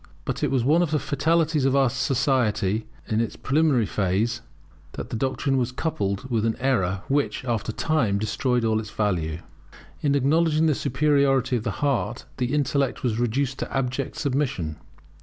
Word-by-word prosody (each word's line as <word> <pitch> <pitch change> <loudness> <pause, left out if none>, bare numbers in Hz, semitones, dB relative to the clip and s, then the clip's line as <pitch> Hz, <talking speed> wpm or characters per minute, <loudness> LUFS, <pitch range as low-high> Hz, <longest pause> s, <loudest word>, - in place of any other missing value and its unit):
But - - -3
it 145 - +2
was 130 -3 +1
one 155 +7 +4
of 175 - +1
the 155 - +1
fatalities 155 +2 +1
of 135 -1 +3
society 110 -6 +1 0.2
in 110 +1 +1
its 115 -3 -3
preliminary 140 -4 +2
phase, 100 +4 0 0.5
that - - -7
the - - -2
doctrine 135 +3 0
was 125 -1 0
coupled 105 -7 -2
with 115 -4 0
an 115 0 +1
error 100 -8 0
which, 140 -2 0
after 115 -2 -1
a - - -15
time, 130 -11 +1
destroyed 115 +3 0
all 110 -1 +2
its 110 -1 -6
value. 85 -7 -1 0.6
In 140 -1 +2
acknowledging 155 +3 +3
the 155 - +4
superiority 135 -1 +2
of 115 - -1
the 115 - -1 0.2
heart 120 -4 -1
the 125 -1 -1
intellect 140 -3 0
was 115 -3 0
reduced 130 +3 0
to - - -4
abject 135 0 -2
submission. 130 - -1
130 Hz, 170 wpm, -24 LUFS, 110-140 Hz, 0.6 s, one